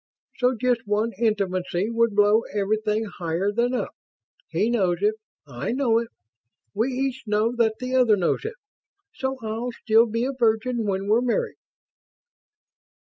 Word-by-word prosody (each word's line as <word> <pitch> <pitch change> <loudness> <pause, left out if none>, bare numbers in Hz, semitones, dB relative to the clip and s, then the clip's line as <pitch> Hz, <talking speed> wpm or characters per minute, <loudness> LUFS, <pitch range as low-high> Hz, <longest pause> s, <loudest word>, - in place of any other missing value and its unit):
So 250 0 +2
just 245 -3 0
one 210 +3 +1
intimacy 195 -3 0
would 230 -2 +1
blow 210 +2 +5
everything 215 +2 0
higher 180 0 -2
than 240 +4 0
up. - - -3 0.6
He 215 - +1
knows 190 -7 +1
it. 210 +1 +3 0.3
I 140 - -4
know 245 -4 +2
it. 235 - -4 0.7
We 220 +4 +1
each 260 0 -2
know 215 +3 +1
that 220 -2 +2
the 255 0 -2
other 245 -4 +5
knows 180 - 0
it. 445 +2 -5 0.6
So 265 0 -3
I'll 225 +3 -3
still 230 0 +3
be 230 +2 -1
a 270 - -2
virgin 235 -1 +1
when 195 0 -1
we're 220 +3 +4
married." 245 -2 -1
225 Hz, 150 wpm, -24 LUFS, 205-245 Hz, 0.7 s, blow